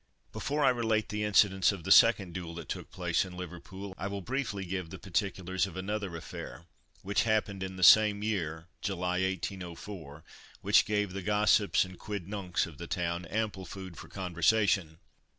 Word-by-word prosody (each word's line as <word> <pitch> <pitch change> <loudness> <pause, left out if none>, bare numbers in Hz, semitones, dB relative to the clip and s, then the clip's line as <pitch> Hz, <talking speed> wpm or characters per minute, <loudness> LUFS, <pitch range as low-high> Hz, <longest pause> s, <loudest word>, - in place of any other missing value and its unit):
Before 145 +1 -1
I - - +7
relate 115 -3 +1
the 105 0 -2
incidents 100 -2 +4
of 95 -5 -7
the 95 - -2
second 100 -5 +6
duel 85 -3 -6
that 85 - -7
took - - -5
place 90 -2 0
in 90 -1 -9
Liverpool, 90 +2 -8
I 100 - -2
will 100 0 -4
briefly 120 -6 -3
give 90 -2 -4
the 95 - -8
particulars 95 -1 -1
of 95 - -9
another 100 -1 -3
affair, 85 +1 -8 0.4
which 100 +2 +1
happened 105 -3 0
in 95 0 -4
the 95 - -3
same 105 +2 +7
year 85 -7 -2 0.2
(July, 90 -1 -1
1804), 90 -4 -5 0.4
which - - +5
gave 105 -3 0
the 100 - -4
gossips 105 0 +3
and 95 -1 -12
quid 105 -4 -5
nuncs 95 -4 -1
of 75 -4 -12
the 85 - -6
town 85 0 -2
ample 100 0 -3
food 95 -2 -8
for - - -10
conversation. 90 -1 +1
95 Hz, 175 wpm, -30 LUFS, 90-105 Hz, 0.4 s, I